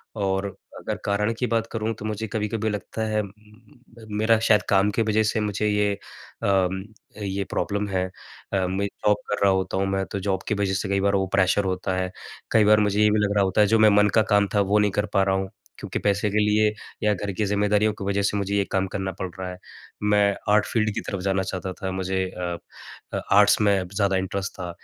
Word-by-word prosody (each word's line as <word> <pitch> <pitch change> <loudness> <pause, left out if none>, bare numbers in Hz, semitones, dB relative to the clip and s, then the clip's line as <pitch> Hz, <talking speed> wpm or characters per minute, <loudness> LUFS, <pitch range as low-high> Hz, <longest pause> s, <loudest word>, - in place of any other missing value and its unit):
और 95 -2 -1 0.3
अगर - - -3
कारण 105 +2 +1
की 125 - 0
बात 115 -1 0
करूँ 110 0 -2
तो 105 - -7
मुझे 110 +1 -3
कभी-कभी 110 0 -2
लगता 105 +1 -4
है 110 0 +1
उम, 100 - -7 0.9
मेरा 110 +1 +3
शायद 105 -2 +5
काम 100 +1 +3
की 115 - 0
वज़ह 110 0 +2
से - - 0
मुझे 105 0 -1
ये 105 0 +1
अ, 95 -1 -2 0.5
ये 100 0 -2
प्रॉब्लम 100 0 -1
है 95 -1 0 0.5
अ, 95 -2 +1
मैं 95 +2 -1 0.2
जॉब 105 0 +4
कर 105 - -1
रहा 100 - +5
होता 95 0 -1
हूँ 95 - +1
मैं 95 0 -1
तो 100 - -2
जॉब 95 -1 -2
की 105 - +1
वज़ह 100 -1 0
से 95 +1 -2
कई 100 0 +1
बार 100 0 +2
वो 95 -1 +1
प्रेशर 100 +1 +3
होता 95 0 -1
है। 90 0 -2 0.4
कई 110 - +5
बार 105 +1 +6
मुझे 105 0 +1
ये 105 - +5
भी 105 - +2
लग 100 - -1
रहा 100 - +4
होता 95 +2 +2
है 105 - +5
जो 110 +2 +3
मैं 110 0 +7
मन 105 0 +4
का - - +4
काम 100 -1 +4
था 100 - +4
वो 105 - +5
नहीं 105 -1 +2
कर 105 +2 0
पा 100 -2 +4
रहा 95 0 +1
हूँ 95 0 -2 0.3
क्योंकि - - -4
पैसे 100 +1 +1
के 105 - 0
लिए 105 0 +3 0.3
या 105 0 +3
घर 100 +1 -4
की 105 - +1
ज़िम्मेदारियों 105 +1 +2
की 105 - -8
वजह 100 0 0
से 100 +1 +1
मुझे 100 0 -1
ये 100 - +3
काम 95 0 +1
करना 95 0 -3
पड़ 95 - -2
रहा 95 -1 -4
है। 90 - -9 0.5
मैं 105 -1 +3 0.2
आर्ट 105 -1 +4
फ़ील्ड 110 -2 +1
की - - -2
तरफ़ 100 -3 -3
जाना 95 -1 +1
चाहता 95 0 -4
था 95 -1 -2
मुझे 95 0 -1
अ 90 -2 -4 0.6
अ, - - -1
आर्ट्स 100 +1 +6
में 100 -3 +2
ज़्यादा 100 -1 +2
इंटरेस्ट 95 +1 -3
था। 90 -1 -4
100 Hz, 235 wpm, -24 LUFS, 95-105 Hz, 0.9 s, मैं